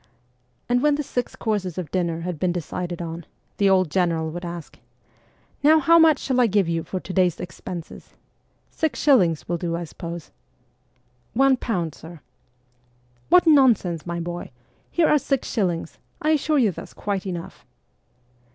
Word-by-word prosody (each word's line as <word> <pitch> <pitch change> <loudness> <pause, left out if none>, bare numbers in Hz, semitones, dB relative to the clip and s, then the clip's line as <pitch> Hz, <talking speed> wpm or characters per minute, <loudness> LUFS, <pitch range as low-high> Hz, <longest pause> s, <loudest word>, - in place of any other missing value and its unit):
And 245 0 +2
when 295 0 +3
the 295 - -2
six 245 -3 -3
courses 205 -6 -2
of 175 -6 -5
dinner 170 -3 -1
had 175 -2 -4
been 180 +1 +1
decided 175 0 -4
on, 165 +1 -6 0.4
th& 200 -1 +4
old 185 -4 +3
general 165 -3 0
would 175 +2 -6
ask, 170 -2 -8 0.4
' - - -36
Now 310 +2 +6
how 335 +3 +5
much 320 -3 +6
shall 255 -2 0
I 240 - +5
give 200 -3 +2
you 165 0 0
for 185 - -4
to 185 - -8
day's 180 -3 +2
expenses? 175 -1 -8 0.6
Six 315 -2 -2
shillings 185 - +3
will 175 0 -2
do, 170 -1 -2
I 170 - -3
suppose? 170 0 -8 0.3
' 120 0 -42
' 125 -1 -41
One 270 -1 +5
pound, 180 - -2
sir.' 165 +1 -12 0.6
' 120 0 -38
What 360 0 +6
nonsense, 235 - +4
my 170 0 -3
boy! 175 +1 -5 0.4
Here 340 -2 +2
are 300 - +4
six 275 -1 -1
shillings; 175 -6 -2 0.2
I 310 - +1
assure 305 0 +2
you 230 -7 +3
that's - - -10
quite 200 -2 -3
enough.' 175 -2 -6
180 Hz, 175 wpm, -23 LUFS, 165-245 Hz, 0.6 s, Now